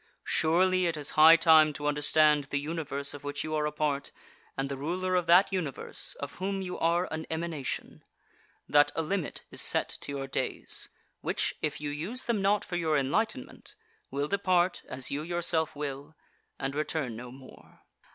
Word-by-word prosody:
Surely 185 Hz, +3 st, +3 dB
it 165 Hz, -2 st, -1 dB
is 145 Hz, -1 st, -2 dB
high 160 Hz, +2 st, +8 dB
time 160 Hz, -2 st, +6 dB
to 145 Hz, -, -6 dB
understand 150 Hz, 0 st, +3 dB
the 140 Hz, +1 st, -2 dB
Universe 145 Hz, -2 st, -3 dB
of 145 Hz, 0 st, -10 dB
which 145 Hz, 0 st, -4 dB
you 155 Hz, -, -4 dB
are 150 Hz, -1 st, +1 dB
a -, -, -3 dB
part, 150 Hz, -2 st, -2 dB, 0.5 s
and 135 Hz, 0 st, -1 dB
the 140 Hz, -, -4 dB
Ruler 180 Hz, +7 st, -2 dB
of 180 Hz, -2 st, +1 dB
that 180 Hz, +3 st, +5 dB
Universe, 160 Hz, -8 st, -1 dB
of -, -, -7 dB
whom 195 Hz, +1 st, -2 dB
you 185 Hz, -1 st, -5 dB
are 170 Hz, +2 st, +2 dB
an 160 Hz, 0 st, -5 dB
emanation; 160 Hz, -4 st, -4 dB, 0.6 s
that 145 Hz, 0 st, +5 dB
a 165 Hz, -, 0 dB
limit 175 Hz, 0 st, -3 dB
is -, -, -2 dB
set -, -, 0 dB
to -, -, -5 dB
your 140 Hz, -1 st, -4 dB
days, 135 Hz, -, -2 dB, 0.3 s
which, -, -, 0 dB
if 150 Hz, -, -2 dB
you 145 Hz, -1 st, -4 dB
use 180 Hz, -, -3 dB
them 230 Hz, -4 st, 0 dB
not 200 Hz, +1 st, +2 dB
for 175 Hz, -, -3 dB
your 160 Hz, -3 st, +1 dB
enlightenment, 220 Hz, -, -2 dB, 0.3 s
will 140 Hz, +1 st, -2 dB
depart, 185 Hz, -1 st, +1 dB
as 130 Hz, 0 st, -2 dB
you 145 Hz, +2 st, -2 dB
yourself 165 Hz, -1 st, 0 dB
will, 145 Hz, +1 st, -6 dB, 0.4 s
and 135 Hz, +1 st, -3 dB
return 150 Hz, -4 st, -2 dB
no 120 Hz, +2 st, -8 dB
more. 130 Hz, 0 st, -16 dB
155 Hz, 180 wpm, -29 LUFS, 145-175 Hz, 0.6 s, high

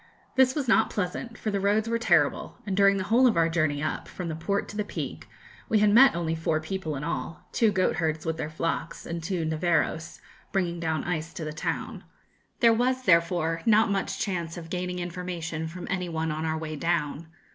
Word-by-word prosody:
This 260 Hz, -1 st, +4 dB
was 285 Hz, -4 st, -1 dB
not 230 Hz, -, +4 dB
pleasant, 205 Hz, +4 st, -3 dB
for 215 Hz, -, -2 dB
the 200 Hz, -, 0 dB
roads 205 Hz, +3 st, +2 dB
were 230 Hz, 0 st, 0 dB
terrible, 170 Hz, -10 st, +2 dB
and 195 Hz, -2 st, -2 dB
during 195 Hz, 0 st, +5 dB
the 190 Hz, -, -1 dB
whole 235 Hz, +6 st, +4 dB
of 225 Hz, -, +2 dB
our 165 Hz, -1 st, +4 dB
journey 155 Hz, -3 st, 0 dB
up, 155 Hz, -, -3 dB
from 180 Hz, -2 st, -5 dB
the 160 Hz, -, -3 dB
port 200 Hz, +5 st, -1 dB
to -, -, -8 dB
the 210 Hz, -, 0 dB
Peak, 205 Hz, -, -6 dB, 0.4 s
we 220 Hz, -, +4 dB
had 210 Hz, 0 st, +4 dB
met 265 Hz, -2 st, +7 dB
only 165 Hz, -1 st, -1 dB
four 160 Hz, -1 st, 0 dB
people 160 Hz, -1 st, -4 dB
in 135 Hz, -, -5 dB
all 160 Hz, 0 st, -4 dB
two 225 Hz, -3 st, +3 dB
goatherds 165 Hz, -5 st, 0 dB
with 160 Hz, 0 st, -1 dB
their 155 Hz, -, -3 dB
flocks, 165 Hz, +1 st, -3 dB
and 170 Hz, 0 st, -4 dB
two 170 Hz, -1 st, -2 dB
'neveros,' 160 Hz, 0 st, 0 dB, 0.3 s
bringing 175 Hz, -3 st, 0 dB
down 160 Hz, -3 st, -1 dB
ice 165 Hz, -2 st, -3 dB
to 160 Hz, -, -5 dB
the 155 Hz, -, -4 dB
town. -, -, -4 dB, 0.6 s
There 230 Hz, -2 st, +7 dB
was 255 Hz, +3 st, +1 dB
therefore 170 Hz, -3 st, +2 dB
not 220 Hz, 0 st, +5 dB
much 195 Hz, 0 st, -1 dB
chance 170 Hz, -5 st, -2 dB
of 165 Hz, -1 st, -9 dB
gaining 180 Hz, 0 st, -2 dB
information 175 Hz, -2 st, -4 dB
from 175 Hz, +2 st, -7 dB
any 180 Hz, -2 st, -2 dB
one 160 Hz, -1 st, -1 dB
on 155 Hz, +1 st, -3 dB
our 160 Hz, 0 st, -1 dB
way 155 Hz, -1 st, -5 dB
down. 165 Hz, -1 st, -1 dB
175 Hz, 210 wpm, -27 LUFS, 160-200 Hz, 0.6 s, met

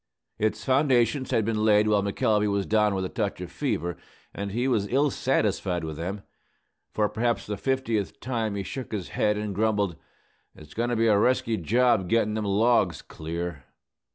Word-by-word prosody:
Its 110 Hz, +1 st, -1 dB
foundations 130 Hz, -2 st, +2 dB
had 110 Hz, -, +1 dB
been 110 Hz, -1 st, 0 dB
laid 105 Hz, -1 st, +4 dB
while 105 Hz, -1 st, +3 dB
McElvey 105 Hz, +1 st, +1 dB
was 100 Hz, -1 st, 0 dB
down 105 Hz, -2 st, +2 dB
with 95 Hz, -1 st, -1 dB
a -, -, -4 dB
touch 105 Hz, -6 st, -2 dB
of 90 Hz, -2 st, -7 dB
fever, 85 Hz, 0 st, -2 dB, 0.4 s
and 100 Hz, 0 st, -4 dB
he 120 Hz, +5 st, 0 dB
was 110 Hz, -6 st, +1 dB
ill 140 Hz, +5 st, +2 dB
satisfied 100 Hz, -8 st, 0 dB
with 80 Hz, -1 st, -5 dB
them. 95 Hz, +6 st, -5 dB, 0.7 s
For 105 Hz, -1 st, +1 dB
perhaps 120 Hz, +2 st, -1 dB
the 105 Hz, -, -3 dB
fiftieth 115 Hz, -7 st, -1 dB
time, 115 Hz, -4 st, -2 dB
he 100 Hz, -, -3 dB
shook 130 Hz, +4 st, -6 dB
his 100 Hz, -4 st, -4 dB
head 105 Hz, 0 st, +1 dB
and 105 Hz, -1 st, -3 dB
grumbled, 105 Hz, -3 st, +1 dB, 0.6 s
"It's 75 Hz, -1 st, -14 dB
goin' 120 Hz, +2 st, -1 dB
to 120 Hz, -, 0 dB
be 115 Hz, 0 st, +2 dB
a 105 Hz, -3 st, +4 dB
resky 115 Hz, -1 st, +2 dB
job 115 Hz, 0 st, +2 dB
gittin' 115 Hz, -2 st, +2 dB
them 110 Hz, -1 st, -2 dB
logs 100 Hz, -, +2 dB
clear." 85 Hz, -3 st, -6 dB
105 Hz, 180 wpm, -26 LUFS, 100-115 Hz, 0.7 s, laid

